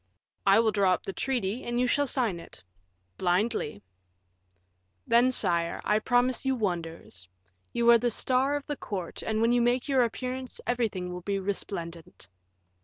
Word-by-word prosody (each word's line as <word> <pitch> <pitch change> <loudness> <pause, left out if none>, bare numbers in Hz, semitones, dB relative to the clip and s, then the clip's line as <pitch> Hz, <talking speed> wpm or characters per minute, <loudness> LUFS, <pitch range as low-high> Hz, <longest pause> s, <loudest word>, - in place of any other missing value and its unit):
"I 195 +2 +6
will 225 -1 +3
draw 200 -3 +3
up - - -12
the 195 - -5
treaty, 245 -3 -2
and 240 0 -2
you 250 - +3
shall 285 +3 +1
sign 230 -10 0
it." 95 - -12 0.6
"Blindly." 180 - 0 1.2
"Then, 240 +2 +4
sire, 170 -7 +1
I 210 0 +2
promise 245 +2 +2
you 265 0 +1
wonders; 165 - -4 0.4
you 235 0 0
are 235 - +7
the 240 +1 +1
star 260 +4 +1
of 290 - -4
the 290 - -4
court, 185 -4 -5
and 220 0 -1
when 230 +1 +3
you 245 0 +3
make 245 +2 +1
your 270 -3 +3
appearance, 255 +2 -3
everything 210 -7 -1
will 180 - -6
be 200 +2 -2
resplendent." 180 -3 -5
225 Hz, 165 wpm, -28 LUFS, 185-250 Hz, 1.2 s, are